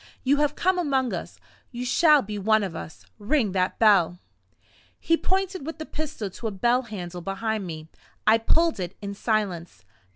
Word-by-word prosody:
You 275 +2 +3
have 295 0 +1
come 370 0 +1
among 270 -6 0
us - - -6 0.3
you 245 0 -5
shall 300 +2 +5
be 210 0 -5
one 215 +2 +3
of 185 -4 -4
us. 160 - -9
Ring 215 0 +1
that 185 0 0
bell." 195 -6 +4 0.8
He 330 - +2
pointed 380 0 -1
with 320 +3 -6
the 315 - -6
pistol 295 -12 -5
to 225 - -5
a - - -2
bell 240 +6 +2
handle 180 -7 -7
behind 200 +2 -3
me. 155 -2 -7 0.4
I 220 +1 +5
pulled 330 +5 +2
it 180 0 -5
in 200 0 -4
silence. 190 - -2
220 Hz, 175 wpm, -25 LUFS, 195-290 Hz, 0.8 s, shall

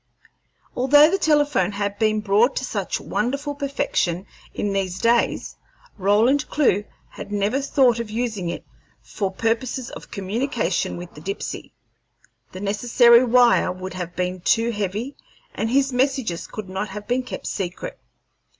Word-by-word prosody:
Although 290 +5 +6
the 390 - +1
telephone 290 - +2
had 205 0 -3
been 215 -1 +2
brought 215 +6 +3
to 260 - -2
such 200 -6 -3
wonderful 280 +6 -2
perfection 270 - -1 0.3
in 205 -1 -2
these 190 -2 -1
days, 230 +4 +1 0.4
Roland 215 +8 +2
Clewe 210 -9 +2 0.2
had - - -9
never 205 +6 0
thought 260 -4 +3
of 235 -2 -4
using 215 -5 -2
it - - -6 0.4
for 200 -2 -3
purposes 230 +5 -2
of - - -10
communication 210 - -2
with 175 0 -9
the 150 - -12
Dipsey. 195 +5 -5 0.8
The 185 - -8
necessary 235 +4 +5
wire 245 0 +4
would 185 +1 -7
have 180 -1 -6
been 180 0 -2
too 230 +6 +2
heavy, 210 +5 -3 0.4
and 225 - -2
his 275 +1 +2
messages 255 -8 0
could 215 -3 -7
not 190 +3 -3
have 205 +1 -8
been 245 +2 +1
kept 250 - -7
secret. 195 - -4
220 Hz, 145 wpm, -22 LUFS, 195-255 Hz, 0.8 s, Although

